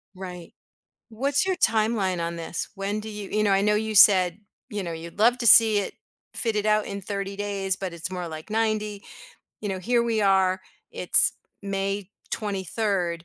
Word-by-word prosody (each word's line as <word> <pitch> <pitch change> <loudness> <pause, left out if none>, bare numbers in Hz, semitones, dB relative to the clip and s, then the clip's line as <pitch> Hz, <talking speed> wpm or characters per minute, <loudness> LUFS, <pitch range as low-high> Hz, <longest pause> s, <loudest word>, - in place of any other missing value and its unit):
Right. 180 -2 -9 0.6
What's 275 +9 0
your 375 -1 0
timeline 215 - +1
on 170 0 -4
this? 165 0 -5
When 200 +2 -3
do 220 - -8
you 210 -2 -7
you 215 - 0
know, 200 - +2
I 195 - +3
know 210 +1 +2
you 220 0 -2
said, 185 -3 +6 0.3
you 205 -2 -3
know, 170 -2 -5
you'd 165 +3 -9
love 235 +3 +4
to 235 - -2
see 220 -2 +8
it 200 - -4 0.4
fitted 215 -3 -1
out 215 0 +2
in 200 0 -5
30 200 0 -5
days, 200 -2 -2
but 190 -2 -5
it's 170 +1 -5
more 180 -1 -5
like 155 +4 -9
90. 215 -2 -1 0.6
You 210 - -4
know, 190 -1 -3
here 235 +4 +1
we 230 -2 0
are, 190 -2 +2 0.3
it's - - +3 0.3
May 195 0 -3 0.2
23rd. 195 -4 -2
200 Hz, 180 wpm, -25 LUFS, 185-215 Hz, 0.6 s, see